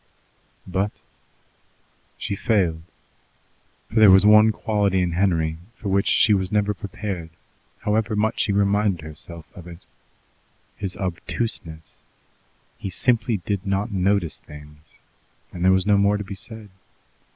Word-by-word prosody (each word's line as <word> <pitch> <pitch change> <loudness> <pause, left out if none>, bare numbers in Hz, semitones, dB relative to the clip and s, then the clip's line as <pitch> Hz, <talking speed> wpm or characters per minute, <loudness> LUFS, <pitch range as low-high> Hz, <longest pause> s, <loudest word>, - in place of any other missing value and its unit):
But 95 +3 -2 1.2
she 100 - -3
failed. 95 -8 +1 1.1
For 110 - +1
there 110 -2 +8
was 95 +1 +7
one 105 +1 +7
quality 105 -3 0
in 90 -1 0
Henry 85 -3 0 0.2
for 100 - -5
which 100 +1 +1
she 110 - +4
was 95 -2 0
never 105 -1 +1
prepared, 95 -4 -6 0.5
however 110 +1 0
much 110 +2 0
she 110 - +1
reminded 100 -2 +1
herself 80 +1 -8
of 90 -3 -11
it: 85 +1 -12 0.9
his 95 -3 -3
obtuseness. 90 -3 -4 0.8
He 100 - -4
simply 115 +3 +1
did 100 -3 -2
not 100 +2 -1
notice 95 -3 0
things, 75 0 -14 0.6
and 85 - -5
there 95 - +5
was 95 0 +2
no 105 -1 +4
more 100 +1 +3
to 105 - -4
be 100 - -8
said. 105 +2 -9
100 Hz, 135 wpm, -23 LUFS, 90-105 Hz, 1.2 s, there